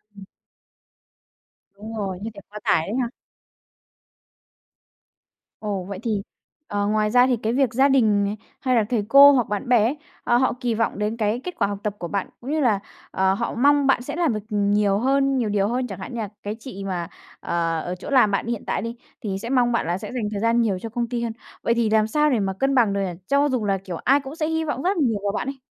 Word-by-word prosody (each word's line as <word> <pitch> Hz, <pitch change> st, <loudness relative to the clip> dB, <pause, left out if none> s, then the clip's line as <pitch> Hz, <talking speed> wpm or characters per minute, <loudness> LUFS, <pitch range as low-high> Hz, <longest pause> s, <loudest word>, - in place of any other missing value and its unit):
Ừm. 200 Hz, -, -11 dB, 1.5 s
Đúng 220 Hz, +2 st, -8 dB
rồi, 190 Hz, -3 st, -3 dB
như 220 Hz, -, -4 dB
thể 200 Hz, -, -9 dB
quá 210 Hz, +1 st, -8 dB
tải 160 Hz, +2 st, +2 dB
đấy 215 Hz, -, -3 dB
ha. 235 Hz, -, -1 dB, 2.5 s
Ồ, 205 Hz, -3 st, -3 dB
vậy 190 Hz, +1 st, -7 dB
thì, 215 Hz, -4 st, -1 dB, 0.5 s
ờ, 205 Hz, 0 st, -1 dB
ngoài 215 Hz, 0 st, +1 dB
ra 250 Hz, +2 st, +5 dB
thì 250 Hz, -3 st, +2 dB
cái 220 Hz, +1 st, -2 dB
việc 265 Hz, -3 st, +2 dB
gia 270 Hz, +3 st, +4 dB
đình 220 Hz, -7 st, +3 dB
nè, 200 Hz, +1 st, -1 dB, 0.3 s
hay 255 Hz, -1 st, +1 dB
là 225 Hz, -, +4 dB
thầy 225 Hz, -5 st, +1 dB
cô 280 Hz, +2 st, +9 dB
hoặc 250 Hz, -5 st, +2 dB
bạn 205 Hz, +3 st, -3 dB
bè 240 Hz, -4 st, +5 dB
ấy, 250 Hz, +7 st, 0 dB, 0.3 s
ờ, 240 Hz, -, +3 dB
họ 260 Hz, -, +2 dB
kì 240 Hz, -2 st, 0 dB
vọng 220 Hz, -2 st, -1 dB
đến 210 Hz, +2 st, -1 dB
cái 220 Hz, +2 st, 0 dB
kết 360 Hz, -, -5 dB
quả -, -, +2 dB
học 205 Hz, -, -4 dB
tập 210 Hz, -1 st, -2 dB
của 175 Hz, -, -4 dB
bạn 200 Hz, 0 st, -2 dB
cũng 260 Hz, +4 st, -5 dB
như 310 Hz, -, +1 dB
là, 225 Hz, -8 st, +2 dB, 0.3 s
ờ, 190 Hz, 0 st, +2 dB
họ 235 Hz, +4 st, -3 dB
mong 285 Hz, +2 st, +4 dB
bạn 260 Hz, -2 st, +3 dB
sẽ 290 Hz, +5 st, -5 dB
làm 335 Hz, -7 st, +1 dB
được 215 Hz, -, -2 dB
nhiều 205 Hz, -1 st, +2 dB
hơn, 275 Hz, +2 st, +2 dB
nhiều 230 Hz, -4 st, 0 dB
điều 205 Hz, -1 st, +1 dB
hơn. 250 Hz, +2 st, -1 dB
Chẳng 195 Hz, -3 st, -7 dB
hạn 190 Hz, +6 st, -7 dB
như 235 Hz, -, -4 dB
là 205 Hz, -, -4 dB
cái 205 Hz, +1 st, -3 dB
chị 220 Hz, -5 st, -8 dB
mà, 175 Hz, -3 st, -3 dB, 0.3 s
à, 165 Hz, -1 st, -1 dB
ở 180 Hz, +3 st, -4 dB
chỗ -, -, -8 dB
làm 250 Hz, -7 st, +4 dB
bạn 200 Hz, -, -1 dB
hiện 235 Hz, -2 st, -3 dB
tại -, -, -1 dB
đi 230 Hz, +2 st, -5 dB, 0.3 s
thì 195 Hz, -3 st, -3 dB
sẽ 230 Hz, -, -5 dB
mong 250 Hz, -2 st, +3 dB
bạn 235 Hz, -, 0 dB
là 175 Hz, -, 0 dB
sẽ -, -, -7 dB
dành 245 Hz, -4 st, -2 dB
thời 205 Hz, -, -3 dB
gian 230 Hz, +1 st, +3 dB
nhiều 200 Hz, -5 st, 0 dB
cho 225 Hz, -, -6 dB
công 235 Hz, +1 st, -2 dB
ty 240 Hz, -1 st, -2 dB
hơn, 230 Hz, -, -2 dB, 0.3 s
vậy 230 Hz, -, +2 dB
thì 235 Hz, -2 st, +1 dB
làm 215 Hz, 0 st, +3 dB
sao 300 Hz, +5 st, +2 dB
để 245 Hz, -, +2 dB
mà 195 Hz, -1 st, -1 dB
cân 270 Hz, 0 st, +2 dB
bằng 225 Hz, -6 st, +4 dB
được 200 Hz, -, 0 dB
nhỉ, 190 Hz, -, -1 dB, 0.2 s
cho 280 Hz, +1 st, +3 dB
dù 250 Hz, -5 st, -1 dB
là, 195 Hz, -1 st, +1 dB
kiểu, 185 Hz, -2 st, -7 dB
ai 275 Hz, -, +3 dB
cũng 275 Hz, +1 st, -8 dB
sẽ 315 Hz, -2 st, -1 dB
hy 320 Hz, 0 st, 0 dB
vọng 290 Hz, -3 st, -2 dB
rất 380 Hz, +2 st, +1 dB
nhiều 235 Hz, -9 st, +1 dB
vào 200 Hz, -, 0 dB
bạn 215 Hz, -, -3 dB
ấy? 275 Hz, -1 st, -5 dB
225 Hz, 255 wpm, -23 LUFS, 205-255 Hz, 2.5 s, cô